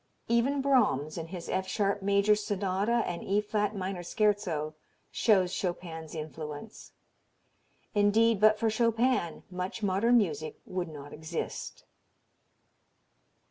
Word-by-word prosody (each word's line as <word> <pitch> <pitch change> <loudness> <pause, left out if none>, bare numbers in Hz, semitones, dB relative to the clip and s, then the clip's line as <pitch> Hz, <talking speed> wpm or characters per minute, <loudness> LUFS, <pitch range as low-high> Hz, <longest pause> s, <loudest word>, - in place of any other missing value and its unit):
Even 260 +4 +2
Brahms 205 - +2
in 165 -1 -5
his 175 0 -7
F 190 0 -1
sharp 200 -1 0
major 200 +1 +4
Sonata 205 +2 0
and 175 -1 -4
E 200 +2 +1
flat 210 0 -1
minor 190 -1 -3
Scherzo 175 -5 0 0.4
shows 190 -5 +3
Chopin's 170 -4 -4
influence. 155 +5 -7 1.0
Indeed 210 +1 +3
but 215 0 +6
for 225 0 +1
Chopin 230 -5 +1
much 180 +4 -4
modern 205 +5 +3
music 155 -8 -1
would 180 -1 -3
not 145 -2 -9
exist. 155 +1 -5
195 Hz, 115 wpm, -30 LUFS, 170-215 Hz, 1.0 s, but